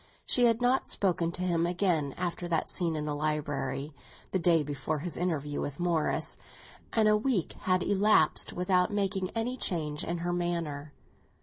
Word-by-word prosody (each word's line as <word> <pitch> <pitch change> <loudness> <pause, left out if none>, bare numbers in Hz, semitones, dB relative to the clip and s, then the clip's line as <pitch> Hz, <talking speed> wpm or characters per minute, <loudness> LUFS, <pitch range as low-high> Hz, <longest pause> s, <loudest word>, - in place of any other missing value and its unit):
She 245 - +4
had 230 +1 +2
not 255 +2 +2
spoken 175 -4 +1
to 180 - -3
him 170 -2 +1
again 175 -6 0
after 175 -1 -3
that 165 -2 0
scene 170 -3 +1
in 150 -1 -3
the 150 - -2
library, 145 -1 -2 0.4
the 190 - +1
day 165 -2 +3
before 145 +2 -3
his 170 +4 -3
interview 150 -5 -2
with 145 +2 -5
Morris; 170 -3 0 0.5
and 220 -2 +3
a 210 - +5
week 210 -5 0 0.2
had 185 -1 +3
elapsed 205 -5 +3
without 180 +2 +1
making 195 -2 -1
any 240 +3 -1
change 150 -8 -2
in 170 +1 -2
her 175 - 0
manner. 165 -4 -3
175 Hz, 170 wpm, -29 LUFS, 155-190 Hz, 0.5 s, a